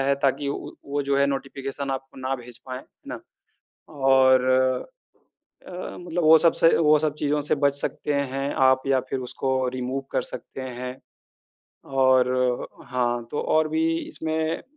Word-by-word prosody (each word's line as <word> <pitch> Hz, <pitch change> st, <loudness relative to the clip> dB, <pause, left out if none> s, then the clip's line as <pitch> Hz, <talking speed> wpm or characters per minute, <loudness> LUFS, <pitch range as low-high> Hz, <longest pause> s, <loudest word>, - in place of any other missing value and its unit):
है 140 Hz, +1 st, +2 dB
ताकि 140 Hz, +1 st, +1 dB
उ 140 Hz, -, -1 dB
उ -, -, -8 dB, 0.2 s
वो 145 Hz, 0 st, 0 dB
जो 140 Hz, 0 st, 0 dB
है 140 Hz, -, +4 dB
नोटिफ़िकेशन 135 Hz, 0 st, -4 dB
आपको 135 Hz, 0 st, -5 dB
ना 130 Hz, +1 st, -1 dB
भेज 120 Hz, -1 st, -11 dB
पाएँ, 130 Hz, -1 st, -5 dB
है -, -, -19 dB, 0.2 s
ना? -, -, -6 dB, 0.7 s
और 130 Hz, -2 st, +4 dB
अ 130 Hz, 0 st, +2 dB, 0.9 s
अ, 180 Hz, 0 st, -7 dB
मतलब 175 Hz, -1 st, -3 dB
वो 160 Hz, +1 st, +8 dB
सब 165 Hz, 0 st, +4 dB
से 165 Hz, -, +4 dB
वो 155 Hz, -1 st, +5 dB
सब 155 Hz, -1 st, 0 dB
चीज़ों 150 Hz, 0 st, +1 dB
से -, -, +5 dB
बच 140 Hz, -1 st, +2 dB
सकते 150 Hz, -, -3 dB, 0.2 s
हैं 135 Hz, +1 st, -2 dB
आप 130 Hz, 0 st, +3 dB
या 135 Hz, -1 st, +3 dB
फिर 135 Hz, -, -2 dB
उसको 130 Hz, +1 st, -3 dB, 0.2 s
रिमूव 130 Hz, +2 st, -3 dB
कर -, -, +1 dB
सकते 135 Hz, -, -8 dB
हैं 125 Hz, 0 st, -6 dB, 1.0 s
और 130 Hz, -1 st, +4 dB, 0.6 s
हाँ, 120 Hz, -1 st, -1 dB
तो 150 Hz, -, -2 dB
और 155 Hz, 0 st, +2 dB
भी 160 Hz, +1 st, 0 dB, 0.3 s
इसमें 160 Hz, 0 st, -2 dB
135 Hz, 170 wpm, -24 LUFS, 130-150 Hz, 1.0 s, वो